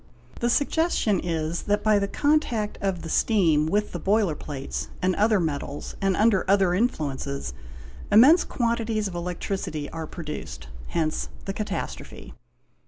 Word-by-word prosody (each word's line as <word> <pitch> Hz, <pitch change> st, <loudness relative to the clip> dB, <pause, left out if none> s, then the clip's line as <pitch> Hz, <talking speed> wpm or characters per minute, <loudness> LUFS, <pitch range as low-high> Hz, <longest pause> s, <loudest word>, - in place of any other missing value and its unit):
The 240 Hz, -, +1 dB
suggestion 285 Hz, -, +1 dB
is 165 Hz, -1 st, -2 dB
that 205 Hz, 0 st, +1 dB
by 215 Hz, -1 st, +4 dB
the 200 Hz, -, 0 dB
contact 245 Hz, -5 st, 0 dB
of 190 Hz, -3 st, -1 dB
the -, -, -5 dB
steam 165 Hz, -5 st, +3 dB
with 210 Hz, +5 st, 0 dB
the 175 Hz, -, -4 dB
boiler 200 Hz, -1 st, +2 dB
plates 140 Hz, -2 st, -5 dB
and 185 Hz, 0 st, +1 dB
other 215 Hz, -1 st, +3 dB
metals 145 Hz, -3 st, -3 dB
and 195 Hz, -1 st, +1 dB
under 215 Hz, -3 st, +4 dB
other 195 Hz, -2 st, +4 dB
influences, 140 Hz, -, -2 dB, 0.6 s
immense 280 Hz, +11 st, +7 dB
quantities 230 Hz, -3 st, -1 dB
of 190 Hz, -, -7 dB
electricity 175 Hz, -3 st, -4 dB
are 165 Hz, -1 st, -5 dB
produced; 150 Hz, -, -7 dB, 0.2 s
hence 155 Hz, -2 st, -1 dB, 0.2 s
the 195 Hz, -, -3 dB
catastrophe. 210 Hz, +1 st, -5 dB
195 Hz, 140 wpm, -25 LUFS, 160-215 Hz, 0.6 s, immense